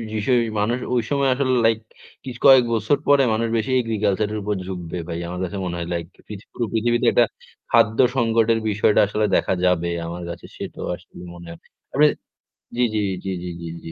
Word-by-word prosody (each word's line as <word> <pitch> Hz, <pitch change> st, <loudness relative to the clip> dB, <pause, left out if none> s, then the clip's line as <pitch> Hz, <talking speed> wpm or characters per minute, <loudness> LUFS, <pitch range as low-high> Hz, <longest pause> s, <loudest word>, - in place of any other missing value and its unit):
বিষয় 125 Hz, +4 st, +2 dB, 0.2 s
মানুষ 115 Hz, +4 st, +1 dB, 0.2 s
ঐ -, -, +2 dB
সময় 140 Hz, -2 st, +1 dB
আসলে 130 Hz, -1 st, 0 dB
লাইক 115 Hz, -1 st, +3 dB, 0.4 s
কি 135 Hz, -, -6 dB, 0.2 s
কয়েক 130 Hz, -2 st, +8 dB
বৎসর 115 Hz, +5 st, +1 dB
পরে 140 Hz, -1 st, +5 dB
মানুষ 115 Hz, +1 st, 0 dB
বেশি 110 Hz, +4 st, -2 dB
agriculture 105 Hz, -2 st, -1 dB
এর -, -, -2 dB
উপর 105 Hz, +1 st, -2 dB
ঝুঁকবে 90 Hz, -2 st, -5 dB
ভাই। 85 Hz, 0 st, -4 dB
আমার 90 Hz, +1 st, -5 dB
কাছে 100 Hz, +2 st, -4 dB
মনে 85 Hz, -1 st, -3 dB
হয় 85 Hz, 0 st, -4 dB
লাইক 85 Hz, -1 st, -3 dB, 0.2 s
পিথি 105 Hz, 0 st, -9 dB
পুরো 120 Hz, -, -2 dB
পৃথিবীতে 120 Hz, +1 st, +1 dB
একটা -, -, +4 dB, 0.5 s
খাদ্য 110 Hz, +3 st, +3 dB, 0.2 s
সংকটের 115 Hz, -1 st, +2 dB
বিষয়টা 105 Hz, +1 st, +2 dB
আসলে 105 Hz, +1 st, 0 dB
দেখা -, -, +1 dB
যাবে 85 Hz, -1 st, +1 dB, 0.2 s
আমার 85 Hz, +1 st, -6 dB
কাছে 85 Hz, -, -8 dB
সেটাও -, -, -6 dB
আসলে -, -, -21 dB, 0.2 s
মনে 85 Hz, -1 st, -11 dB
হয়। 85 Hz, -, -11 dB, 0.3 s
আপনি 150 Hz, +2 st, +5 dB, 0.7 s
জি, -, -, +1 dB
জি, -, -, +2 dB, 0.3 s
জি, -, -, -2 dB
জি, 90 Hz, -, -4 dB
জি, 85 Hz, -, -6 dB, 0.2 s
জি। 80 Hz, -, -8 dB
110 Hz, 195 wpm, -22 LUFS, 90-120 Hz, 0.7 s, কয়েক